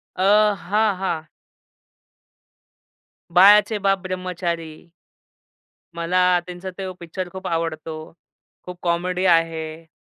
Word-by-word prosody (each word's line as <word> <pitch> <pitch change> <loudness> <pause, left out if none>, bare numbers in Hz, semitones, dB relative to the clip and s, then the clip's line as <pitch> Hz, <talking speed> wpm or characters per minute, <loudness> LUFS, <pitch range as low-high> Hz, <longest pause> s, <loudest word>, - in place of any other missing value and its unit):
अ, 185 +1 +1 0.4
हां, 210 0 +2
हां. 160 -4 -2 2.1
बाळाचे 205 +3 +7
बाप 195 0 +3
ब्रह्मचारी. 175 -3 -4 1.2
मला 180 +1 +2
त्यांचा 180 +1 -7
तो 190 -1 -4
पिक्चर 175 +2 -6
खूप 190 0 -7
आवडतो. 160 -1 -4 0.5
खूप 180 -1 -9
कॉमेडी 180 +2 -1
आहे. 165 -2 0
180 Hz, 90 wpm, -22 LUFS, 165-185 Hz, 2.1 s, बाळाचे